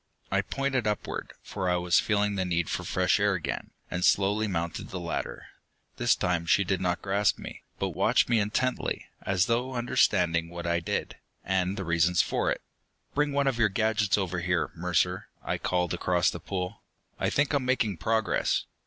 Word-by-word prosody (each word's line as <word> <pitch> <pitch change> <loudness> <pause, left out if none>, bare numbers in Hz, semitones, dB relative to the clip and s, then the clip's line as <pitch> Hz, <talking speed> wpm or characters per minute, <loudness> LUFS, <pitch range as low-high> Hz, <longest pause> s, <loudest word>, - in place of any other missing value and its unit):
I - - +3
pointed 135 -4 -1
upward, 105 -1 -3
for 95 -3 -3
I 90 - +3
was 90 0 +3
feeling 105 -1 +1
the 95 -2 0
need 85 -2 -1
for - - -2
fresh - - +2
air - - +3
again, - - -4 0.2
and 90 0 -2
slowly 105 +4 +3
mounted 85 -3 -3
the 90 - -5
ladder. 85 -1 -4 0.5
This - - +3
time 85 -2 -1
she 100 +4 +4
did 95 0 -1
not 90 -1 -1
grasp 100 0 +2
me, - - -9 0.2
but - - -1
watched - - +2
me 120 -2 +3
intently, 110 +5 -1 0.2
as 95 0 +1
though 125 +3 0
understanding 85 -8 +2
what 85 0 -7
I 85 0 +1
did, 85 - -3 0.3
and 95 0 0
the 95 - -3
reasons 85 +1 +2
for - - 0
it. - - -2 0.5
"Bring 145 0 +1
one 140 0 +1
of 130 -3 0
your 110 -2 +4
gadgets 105 0 +1
over 90 -3 -1
here, 90 0 0
Mercer," 90 +1 0 0.2
I - - -2
called 90 -1 0
across 90 0 +2
the - - -6
pool. 95 +1 -4 0.4
"I - - +1
think 140 +1 +1
I'm 140 -2 +2
making 115 -7 +1
progress." 110 +4 +1
95 Hz, 185 wpm, -28 LUFS, 90-110 Hz, 0.5 s, she